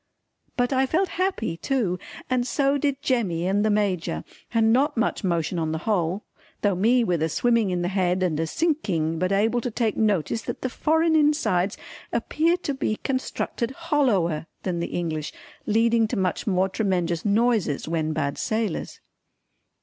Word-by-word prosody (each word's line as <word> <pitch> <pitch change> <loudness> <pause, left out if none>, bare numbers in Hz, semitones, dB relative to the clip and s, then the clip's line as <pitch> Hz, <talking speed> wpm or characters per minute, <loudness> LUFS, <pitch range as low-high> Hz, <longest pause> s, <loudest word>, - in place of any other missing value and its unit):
But 245 +2 +1
I 265 0 +2
felt 360 +6 +1
happy 355 - -1
too 205 -7 -1 0.3
and 250 -1 0
so 280 +1 +1
did 280 0 -1
Jemmy 195 - 0
and 200 +2 +2
the 215 - +2
Major 190 - 0 0.3
and 225 -1 +3
not 270 +2 +2
much 230 0 0
motion 170 -1 0
on 160 -1 -1
the - - -1
whole, 190 -2 0 0.4
though 205 -1 +3
me 235 +7 +3
with 175 -7 0
a 160 - +1
swimming 230 +3 +2
in 180 -1 -1
the - - 0
head 185 -1 +1
and 160 -4 0
a 165 - 0
sinking 175 - 0
but 185 +2 0
able 225 +5 +2
to 245 - -2
take 225 -2 0
notice 210 0 +1
that - - -6
the 260 - -1
foreign 320 +3 +2
insides 290 - +2 0.3
appear 315 +8 +1
to 295 -5 -3
be 265 -5 -1
constructed 260 -2 -2
hollower 255 - 0 0.2
than 180 -3 -2
the 170 - -2
English, 160 -3 -3 0.3
leading 225 +1 +3
to 230 - -3
much 185 +2 -1
more 190 -1 +2
tremenjous 180 -5 -1
noises 210 - +1
when 160 -1 -1
bad 140 -2 -2
sailors. 215 -5 -2
210 Hz, 170 wpm, -25 LUFS, 175-255 Hz, 0.4 s, and